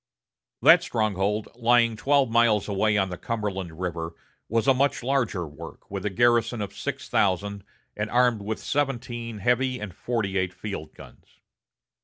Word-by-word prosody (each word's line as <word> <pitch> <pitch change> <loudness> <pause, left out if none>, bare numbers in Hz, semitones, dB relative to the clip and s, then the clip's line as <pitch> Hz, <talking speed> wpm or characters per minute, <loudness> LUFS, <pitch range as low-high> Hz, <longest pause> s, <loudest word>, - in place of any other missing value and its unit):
That - - +8
stronghold, 105 -1 -1
lying 120 -1 +3
twelve 140 +4 +2
miles 115 -3 +3
away 105 +1 +1
on 95 -1 +1
the 90 - -6
Cumberland 95 -7 -4
River, 85 -2 -4 0.3
was 115 +3 +1
a 135 - +7
much 135 -1 +1
larger 120 -9 0
work, 75 +4 -11
with 100 -1 -4
a - - 0
garrison 120 +2 +2
of 100 -1 -5
six - - -5
thousand, 100 +1 0 0.3
and 105 +1 -3
armed 120 -2 +3
with 105 +2 -3
seventeen 120 -5 -2
heavy 125 +4 +1
and 105 -4 -6
forty 100 -4 -2
eight 95 -1 -1
field 100 -7 -6
guns. - - -16
110 Hz, 155 wpm, -25 LUFS, 95-120 Hz, 0.3 s, That